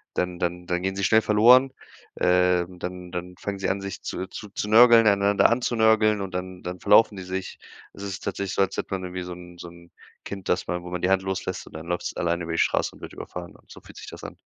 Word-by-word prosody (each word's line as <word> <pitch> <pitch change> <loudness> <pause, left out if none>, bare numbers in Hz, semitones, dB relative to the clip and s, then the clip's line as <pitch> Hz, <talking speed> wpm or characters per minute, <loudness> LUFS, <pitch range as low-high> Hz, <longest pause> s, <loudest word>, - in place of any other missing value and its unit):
dann 90 -1 -2
dann 90 0 -2
dann 90 0 -1
gehen 95 0 -1
sie 100 - -2
schnell 110 +2 +5
verloren. 125 +6 +5 0.5
Ähm, 90 0 +2
dann 90 0 -7
dann 90 0 -5
fangen 100 -1 -4
sie 95 - -1
an, 100 - -1
sich 100 -1 -6
zu 95 - -4
zu 105 +2 -9
zu 105 - -4
nörgeln, 115 0 +7
einander 100 0 +4
an 120 +2 +1
zu 120 - -1
nörgeln 110 -1 +4
und 95 -2 -6
dann 90 0 -6
dann 90 0 -6
verlaufen 105 +1 +5
die 95 - -6
sich. 95 +1 -5 0.3
Es 100 - -10
ist 100 -1 -5
tatsächlich 100 -1 -3
so, - - +2
als 95 - -3
hätte - - -4
man 95 - -3
irgendwie 90 0 -5
so 90 - -8
'n 90 0 -12
so 85 - -8
'n 85 0 -17 0.4
Kind, 95 -2 -7
dass 90 - 0
man 90 0 -3
wo 90 - -8
man 90 - -3
die 90 - +1
Hand 95 0 +3
loslässt 95 -1 -4
und - - -14
dann 80 +2 -9
läuft's 90 0 -3
alleine 85 0 -1
über 85 - -5
die 85 - -2
Straße - - +1
und - - -18
wird - - -9
überfahren 90 -1 -8
und - - -21
so - - -11
fühlt - - -16
sich - - -10
das - - -11
an. - - -8
95 Hz, 265 wpm, -25 LUFS, 90-100 Hz, 0.5 s, nörgeln